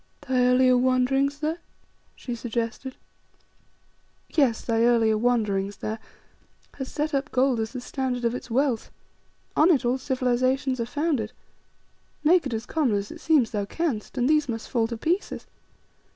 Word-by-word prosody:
"Thy 260 -3 0
earlier 255 0 +5
wanderings 260 +3 +2
there," 315 +3 -1 0.6
she 245 - -6
suggested. 235 +2 -4 1.4
"Yes 265 -8 +2
thy 225 -1 +1
earlier 230 -2 +4
wanderings 210 -4 0
there, 220 +1 -4 0.8
has 265 - -5
set 300 +1 -2
up 275 +2 -1
gold 255 -2 +2
as 220 +2 -3
the 250 - -5
standard 250 -2 -3
of 235 - +1
its 250 - -6
wealth. 250 -1 0 0.7
On 310 +4 +5
it 290 -8 +3
all 250 +2 +1
civilizations 255 0 0
are 230 - -1
founded. 280 -5 -1 0.9
Make 325 -1 +4
it 255 - -5
as 220 - -4
common 285 -9 +1
as 200 0 -3
it - - -10
seems 295 -8 +3
thou 205 -2 -1
canst, 265 -2 -3
and 250 0 +2
these 300 -2 +2
must 225 -1 -4
fall 230 -3 +2
to 230 0 -5
pieces. 345 - -2
250 Hz, 155 wpm, -25 LUFS, 230-275 Hz, 1.4 s, earlier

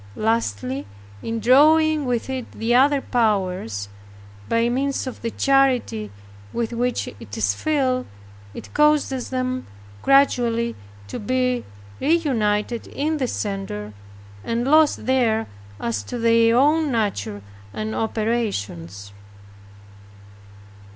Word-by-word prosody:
Lastly 135 - -1 0.3
in 225 0 -3
drawing 305 +5 +5
with 240 -2 -1
it 260 -2 -5
the 230 +2 -1
other 275 +3 +4
powers, 185 - 0 0.6
by 230 +1 +2
means 275 +3 -1
of 260 - -7
the 230 - -2
charity 255 - +1 0.4
with 230 - -2
which 245 +1 -1
it - - -9
is - - +1
filled. 265 -5 0 0.5
It - - -10
causes 295 -4 +2
them 255 0 -2 0.3
gradually 240 -4 +3 0.3
to - - -6
be 250 +2 0 0.3
reunited 240 -8 0
in 310 +2 -2
the 260 -3 -1
Center, 195 - -4 0.5
and 230 +1 -1
lost 305 +2 +4
there 235 -4 +2 0.3
as 110 -1 -2
to - - -5
their 230 0 +4
own 300 +2 +3
nature 110 - -2 0.3
and 215 - -4
operations. 105 - -2
235 Hz, 110 wpm, -22 LUFS, 210-265 Hz, 0.6 s, drawing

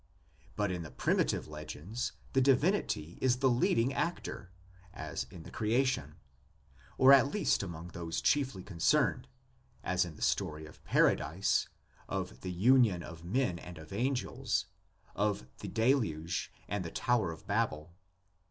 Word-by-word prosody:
But 105 -2 0
in 90 -1 -3
the 80 - -7
primitive - - 0
legends 75 +9 -5 0.2
the 135 - +4
divinity 135 - +1
is 125 -1 +3
the 130 0 +3
leading 120 +1 +2
actor 170 - -3 0.4
(as - - -4
in 85 - -11
the - - -11
creation), 115 - 0 0.8
or 130 +1 +8
at 135 0 +7
least 210 - +2
among 85 -3 -6
those 85 -1 -4
chiefly 135 -10 +1
concerned 85 -5 +1 0.6
(as - - +2
in - - -7
the - - -6
story 75 0 0
of 80 - -15
Paradise, 85 +7 +2 0.4
of 95 -1 -4
the 90 - -4
union 105 -1 +4
of 85 -1 -10
men 95 -1 0
and 90 0 -10
of 80 +3 -10
angels, 125 +4 -1 0.5
of 100 -10 0
the - - -6
Deluge 110 - 0 0.2
and 100 -1 -2
the 85 - -5
Tower 115 -3 +1
of 80 0 -11
Babel). 95 -7 -1
100 Hz, 145 wpm, -32 LUFS, 85-125 Hz, 0.8 s, or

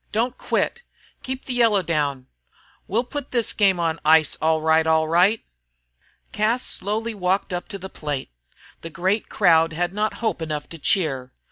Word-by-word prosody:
Don't 235 +3 0
quit! 475 - -1 0.4
Keep 260 0 -6
the 255 - -3
yellow 225 -5 +3
down! 145 -6 -1 0.6
We'll 225 +5 0
put 280 +2 -6
this 235 -3 0
game 195 -4 +3
on 165 -1 0
ice, 155 -1 +4
all 160 0 +2
right, 160 +1 +3
all 160 0 +3
right!" 180 +7 +3 0.9
Cas 225 +4 +1
slowly 220 +3 -2
walked 190 -1 -1
up 175 - -4
to 200 - -6
the 190 0 -7
plate. 145 - -5 0.5
The 165 - -7
great 185 +7 -1
crowd 165 -1 +3
had 175 +3 -1
not 215 +1 -1
hope 220 -6 -2
enough 150 -2 -4
to 165 - -10
cheer. 135 -8 0
180 Hz, 165 wpm, -23 LUFS, 160-215 Hz, 0.9 s, ice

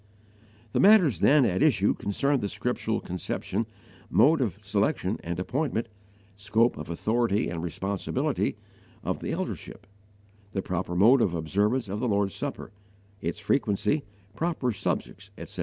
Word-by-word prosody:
The - - 0
matters 185 - +6
then 140 +4 +5
at 95 +1 0
issue 115 -10 +4
concerned 140 +7 0
the 100 - -2
scriptural - - -2
conception, 95 +4 -3 0.4
mode 150 +4 +4
of 105 -8 -1
selection 100 0 0
and 85 +1 -3
appointment, 120 +2 -1 0.5
scope 110 +4 +2
of 75 +1 -8
authority 110 +4 +1
and 85 -1 -4
responsibility, 95 +3 -2 0.5
of - - -2
the - - -4
Eldership; - - -5 0.7
the 95 - -2
proper 90 -1 -3
mode 115 +8 +6
of 90 -5 +1
observance 100 - 0
of 100 +2 -4
the 125 - 0
Lord's 100 -2 +1
Supper, - - -5 0.5
its - - -3
frequency, 105 +4 +1 0.3
proper 155 -4 -1
subjects, - - -3
etc. - - -9
105 Hz, 140 wpm, -27 LUFS, 95-130 Hz, 0.7 s, matters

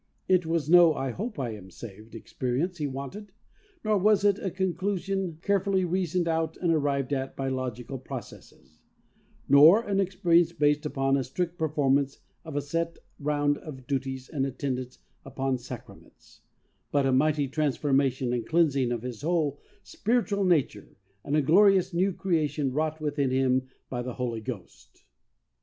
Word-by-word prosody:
It 180 -3 +3
was 165 -3 0
no 170 -1 +7 0.2
"hope 215 - -5
I 125 -4 -2
am 95 -3 -10
saved" 110 +2 -11
expe 125 +2 -4
rience 175 +4 -2
he 150 - -1
wanted; 140 +10 -7 0.5
nor 215 -2 +2
was 210 +1 +3
it 200 0 +3
a 195 - -2
conclusion 190 -1 -2
carefully 195 -2 +1
reasoned 180 -1 0
out 160 -1 -1
and 170 -2 +1
arrived 140 -3 0
at 135 -1 -3
by 135 -1 -2
logical 130 0 -4
processes; 130 -3 -11 0.7
nor 155 +11 +7
an 195 -3 -1
experience 175 -3 +2
based 150 -1 +1
upon 135 -1 +1
a 135 - 0
strict 170 +7 -3
performance 140 -3 +1 0.3
of 160 -3 -8
a 145 - -1
set 165 +3 -2 0.2
round 145 0 0
of 130 -5 -10
duties 130 -2 -3
and 140 -4 -2
attendance 130 -1 -4 0.3
upon 135 -1 -2
sacraments, 120 - -12 0.5
but 140 -2 +2
a 135 - +2
mighty 145 +2 +2
transformation 135 -3 0
and 120 -2 -2
cleansing 140 -7 +2
of 120 -1 -3
his 125 -2 -6
whole 155 -3 0 0.2
spiritual 220 -3 0
nature 150 - 0 0.3
and 145 - -1
a 155 - +3
glorious 190 +3 +4
new 185 +3 +2
creation 155 -7 -1
wrought 155 +2 -1
within 145 -3 -1
him 130 0 +1 0.2
by 120 -2 -4
the 125 0 -5
Holy 120 -3 -3
Ghost. 100 - -9
145 Hz, 155 wpm, -27 LUFS, 130-175 Hz, 0.7 s, no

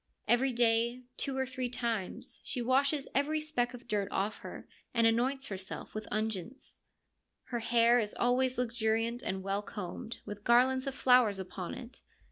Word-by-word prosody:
Every 260 +2 +4
day, 235 +1 +2
two 270 -1 -1
or 265 - +1
three 255 -1 -3
times, 230 -6 -3
she 255 - -3
washes 270 +4 +2
every 295 +3 +2
speck 250 -5 -1
of 245 0 -13
dirt 205 -4 0
off 205 +2 -1
her, - - -9 0.3
and 230 -1 +4
anoints 255 +4 +2
herself 190 -1 -6
with 215 0 -5
unguents. 215 +3 -3 0.7
Her 240 - -1
hair 235 +1 +4
is 210 -2 -2
always 255 +1 +2
luxuriant 230 0 0
and 190 -6 -3
well 195 +1 0
combed, 210 +2 -6
with 205 0 -7
garlands 260 +3 +4
of 270 - -2
flowers 250 -7 +5
upon 185 -1 -5
it. 240 0 -10
235 Hz, 160 wpm, -32 LUFS, 215-255 Hz, 0.7 s, flowers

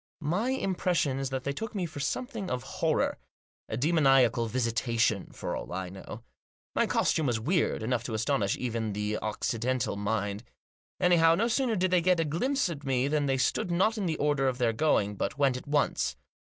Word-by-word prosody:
My 175 - 0
impression 180 - 0
is 135 -1 -2
that 130 -1 -3
they 140 - -1
took 220 +8 -6
me 185 -3 -1
for 155 -3 -7
something 220 - -3
of 125 -2 -2
horror; - - 0 0.5
a 110 - -2
demoniacal 135 -5 +3
visitation, 115 -2 0
for - - -4
all - - -6
I 90 0 -4
know. 95 +4 -9 0.5
My - - +2
costume 155 -3 +1
was 120 -2 +1
weird 150 -1 0
enough 120 +1 0
to 110 - -3
astonish 110 -3 0
even 115 -4 -2
the 105 +1 -2
Occidental 115 +3 -1
mind. 105 0 -2 0.6
Anyhow, 170 -2 +5
no 225 +6 +1
sooner 240 -1 +1
did 185 -1 +1
they 180 -1 +4
get 180 0 +3
a 165 - +2
glimpse 255 - 0
at 155 -4 -6
me 130 -1 +1
than 145 0 +1
they 135 -1 +1
stood 180 +10 0
not 190 +6 +2
on 205 -4 -2
the 160 - -1
order 145 -2 +1
of 130 -1 0
their 120 -3 +1
going, 105 -7 +1
but - - -2
went 140 -3 +3
at 125 - -7
once. 145 0 +1
135 Hz, 195 wpm, -29 LUFS, 115-175 Hz, 0.6 s, Anyhow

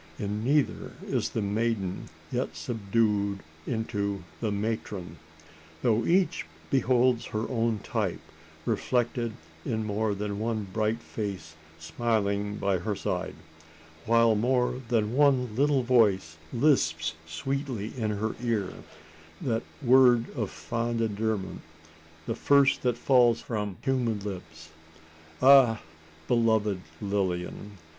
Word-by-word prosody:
In 105 +1 -3
neither 140 +3 +1
is - - -1
the 110 - -2
maiden 100 -2 -1 0.2
yet 80 - -2
subdued 100 +2 0 0.3
into 100 -4 -2 0.2
the 110 -3 -1
matron 100 -3 -3 0.7
though 115 -1 +2
each 180 - +2 0.2
beholds 125 -2 +3
her 110 +1 -2
own 115 -4 0
type - - -2 0.5
reflected 120 -2 0 0.3
in 110 -5 -1
more 105 0 0
than 100 0 -3
one 110 -1 -1
bright 110 +1 0
face 100 -6 -5 0.2
smiling 105 +3 -1
by 100 -3 0
her 105 +4 -2
side; - - -3 0.7
while 115 0 +5
more 125 +3 +1
than 110 -1 +1
one 130 -5 +3
little 140 0 +3
voice 100 -10 +3
lisps 80 - +2
sweetly 120 - -3
in 110 -4 -1
her 105 +1 -2
ear 110 -6 -1 0.7
that 115 -3 -1 0.2
word 125 -2 +5
of 110 -7 -2
fond 115 +9 -3
endearment 110 -2 -1 0.6
the - - -1
first 140 +3 +4
that 125 -2 +1
falls 120 -2 +4
from 105 -5 -4
human 125 -5 0
lips. 90 -5 -8 0.7
Ah! 130 -5 +7 0.5
beloved 110 -5 +2 0.2
Lilian! 100 0 -2
110 Hz, 115 wpm, -28 LUFS, 100-120 Hz, 0.7 s, Ah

